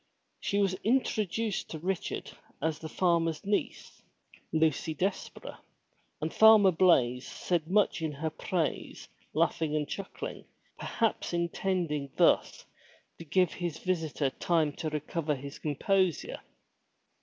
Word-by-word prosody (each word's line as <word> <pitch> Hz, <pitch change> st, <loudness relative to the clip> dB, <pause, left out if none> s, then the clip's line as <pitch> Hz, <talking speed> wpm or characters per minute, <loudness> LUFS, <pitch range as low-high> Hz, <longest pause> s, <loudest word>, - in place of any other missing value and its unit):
She 200 Hz, -, -1 dB
was 195 Hz, -2 st, +2 dB
introduced 220 Hz, -3 st, 0 dB
to 160 Hz, -, -5 dB
Richard 180 Hz, +3 st, -3 dB, 0.3 s
as 160 Hz, 0 st, -1 dB
the 160 Hz, -, -7 dB
farmer's 165 Hz, -2 st, +1 dB
niece, 205 Hz, +1 st, -2 dB, 0.5 s
Lucy 160 Hz, 0 st, +1 dB
Desborough, 190 Hz, +4 st, -3 dB, 0.6 s
and 155 Hz, +2 st, -3 dB
Farmer 220 Hz, -3 st, +7 dB
Blaize 135 Hz, -8 st, +3 dB
said 170 Hz, -3 st, -2 dB
much 200 Hz, -1 st, +2 dB
in 160 Hz, -1 st, -1 dB
her 155 Hz, +3 st, -3 dB
praise 160 Hz, -1 st, -3 dB, 0.3 s
laughing 160 Hz, -1 st, +1 dB
and 150 Hz, -1 st, 0 dB
chuckling, 195 Hz, +5 st, -6 dB, 0.3 s
perhaps 225 Hz, -5 st, -1 dB
intending 170 Hz, -4 st, -1 dB
thus -, -, +3 dB, 0.5 s
to 165 Hz, -, -8 dB
giVe 180 Hz, +2 st, +2 dB
his 170 Hz, -3 st, -4 dB
visitor 160 Hz, -6 st, -1 dB
time 160 Hz, -2 st, +1 dB
to 160 Hz, -, -2 dB
recover 150 Hz, 0 st, -2 dB
his 140 Hz, +1 st, -8 dB
composure. 180 Hz, +3 st, 0 dB
165 Hz, 120 wpm, -30 LUFS, 155-190 Hz, 0.6 s, Farmer